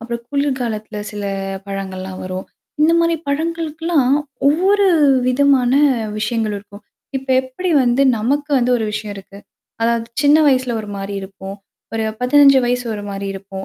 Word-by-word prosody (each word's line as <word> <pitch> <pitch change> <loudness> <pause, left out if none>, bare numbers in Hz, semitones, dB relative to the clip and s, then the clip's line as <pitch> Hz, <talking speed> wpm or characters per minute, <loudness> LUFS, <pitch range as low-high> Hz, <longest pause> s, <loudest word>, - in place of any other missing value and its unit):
அப்புறம் 235 +1 -5
குளிர்கலத்தில 255 -7 -2
சில 210 -1 -6 0.4
பழங்கள்லாம் 190 -1 -6
வரும். 185 0 -5 0.3
இந்த 315 +2 +5
மாரி 335 0 +2
பழங்களுக்குலாம் 320 -2 0 0.3
ஒவ்வொரு 390 +7 +3 0.4
விதமான 255 -1 +3 0.5
விஷயங்கள் 220 -1 -1
இருக்கும். 205 +1 -14 0.3
இப்ப 265 0 -7
எப்படி 260 +8 -4
வந்து 245 +2 +2 0.2
நமக்கு 285 +7 -1
வந்து 250 0 +1
ஒரு 220 - -2
விஷயம் 215 -1 -4
இருக்கு? 195 0 -12 0.4
அதாவது 230 0 +1 0.2
சின்ன 290 +1 +6
வயசுல 255 -3 +1
ஒரு 210 - -9
மாரி 195 +1 -5
இருப்போம். 195 0 -9 0.4
ஒரு 225 0 -1 0.2
15 275 +2 +6
வயசு 245 0 0
ஒரு 205 - -6
மாரி 195 0 -5
இருக்கும். 195 0 -8
240 Hz, 140 wpm, -18 LUFS, 205-285 Hz, 0.5 s, சின்ன